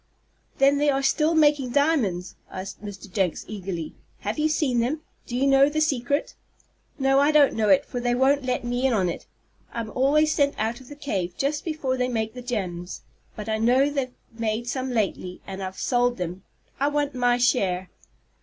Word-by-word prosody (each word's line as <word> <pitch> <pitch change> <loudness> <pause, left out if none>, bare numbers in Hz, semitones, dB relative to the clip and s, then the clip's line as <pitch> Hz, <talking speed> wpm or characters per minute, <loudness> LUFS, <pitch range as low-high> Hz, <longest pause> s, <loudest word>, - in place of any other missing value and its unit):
"Then 280 +1 +4
they 295 0 +3
are 275 -1 +1
still 310 +4 +2
making 295 -5 +3
diamonds?" 260 - +1
asked 190 +2 -7
Mr. 205 -1 -8
Jenks, 190 -5 0
eagerly. 185 -6 -5 0.3
"Have 210 +7 -3
you 310 +1 +2
seen 275 -6 +1
them? 270 +7 0 0.3
Do 240 - -3
you 265 - +2
know 275 +1 +5
the 310 +1 -1
secret?" 285 -2 0 0.6
"No, 270 -1 +3
I 285 +1 +4
don't 295 -2 +5
know 215 -2 +1
it, 280 0 +5
for 245 - -4
they 245 0 +1
won't 270 +2 +3
let 255 -1 -1
me 245 +2 0
in 260 - +1
on 190 -5 +2
it. 170 - -6 0.4
I'm 230 -2 -4
always 300 +5 +3
sent 280 -1 +2
out 225 +4 -2
of 255 - -15
the 290 - -9
cave 190 -12 -3
just 295 +2 -1
before 295 -6 -2
they 250 0 +1
make 220 -2 -2
the 250 - -8
gems. 185 -8 -4 0.3
But 210 0 -7
I 220 0 0
know 255 +5 +3
they've 275 -3 -1 0.3
made 225 +1 -2
some 260 +1 -2
lately, 195 -6 -2
and 195 0 -6
have 190 0 -5
sold 245 -3 +1
'em. 180 +1 -4 0.4
I 280 - +2
want 290 -1 0
my 245 -1 +2
share." 190 -7 +1
250 Hz, 195 wpm, -25 LUFS, 215-280 Hz, 0.6 s, know